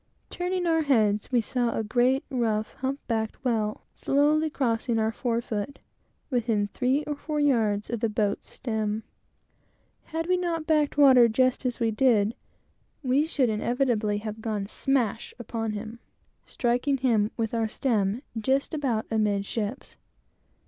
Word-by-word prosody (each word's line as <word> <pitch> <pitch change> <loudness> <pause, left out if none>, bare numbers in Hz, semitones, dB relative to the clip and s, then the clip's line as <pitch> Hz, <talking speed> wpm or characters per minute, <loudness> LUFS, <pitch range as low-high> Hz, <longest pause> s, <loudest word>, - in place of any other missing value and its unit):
Turning 360 0 -2
our 325 -1 +3
heads, 215 -8 +2
we 245 -2 +3
saw 240 +1 -1
a 225 - 0
great, 250 +4 +2
rough, 220 -4 0
hump 270 +2 -2
backed 220 +2 -3
whale, 215 -3 0
slowly 300 +3 +2
crossing 235 -4 0
our 220 0 +1
fore 235 0 -1
foot, 225 +3 -4 0.5
within 225 -4 +1
three 255 +7 0
or 295 0 -3
four 300 +1 -3
yards 225 -8 +2
of 235 - -3
the 230 0 0
boat's 210 -1 -1
stem. 220 -3 -3 1.0
Had 325 +1 -3
we 365 0 +3
not 335 -3 -2
backed 300 -2 +1
water 260 -4 +7
just 255 +3 +1
as 245 - -3
we 230 -2 +1
did, 220 -3 +3 0.7
we 275 +4 +2
should 270 -7 +1
inevitably 220 -1 0
have 215 +1 -6
gone 215 -3 -2
smash 235 0 -1
upon 225 -2 -3
him, 220 +2 -6 0.5
striking 250 +3 0
him 230 -5 +2
with 225 -1 -2
our 225 -1 +1
stem 220 -1 0
just 265 +7 0
about 260 -8 -1
amidships. 210 +2 -2
235 Hz, 145 wpm, -26 LUFS, 220-270 Hz, 1.0 s, water